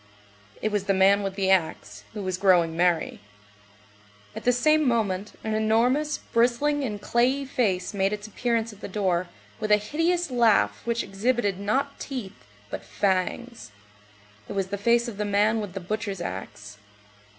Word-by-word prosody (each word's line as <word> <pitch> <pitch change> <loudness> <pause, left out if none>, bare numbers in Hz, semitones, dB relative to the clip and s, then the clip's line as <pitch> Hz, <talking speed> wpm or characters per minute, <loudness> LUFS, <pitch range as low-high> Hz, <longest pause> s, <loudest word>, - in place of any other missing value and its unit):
It 215 - +1
was 205 -2 -1
the 195 -1 +2
man 195 +2 +5
with 195 -1 -3
the 190 -1 +1
axe, 105 - -1
who 205 - -4
was 185 -1 -2
growing 175 -4 +4
merry. 175 -1 +1 1.2
At - - -7
the 245 - +5
same 305 +4 +3
moment, 210 -4 0
an 220 - -2
enormous, 245 +7 +2
bristling, 250 +5 +1
and 210 -5 -3
clayey 255 +6 +1
face 215 -8 -1
made 195 0 +1
its 210 0 -4
appearance 230 +1 -1
at 205 - -17
the - - -5
door, 185 -3 0 0.3
with 215 -1 -2
a 210 - +7
hideous 330 +9 -1
laugh 235 -4 +3
which 235 0 0
exhibited 200 0 -1
not 270 +8 -1
teeth, 240 -8 -7 0.2
but - - -5
fangs. 200 - -2 0.8
It - - -4
was 195 -1 -2
the 200 - -3
face 235 +3 +3
of 225 -4 -7
the 210 - -1
man 210 +2 +2
with 205 -4 -6
the 195 - -4
butcher's 200 +1 -4
axe. 105 - -7
210 Hz, 165 wpm, -25 LUFS, 190-240 Hz, 1.2 s, a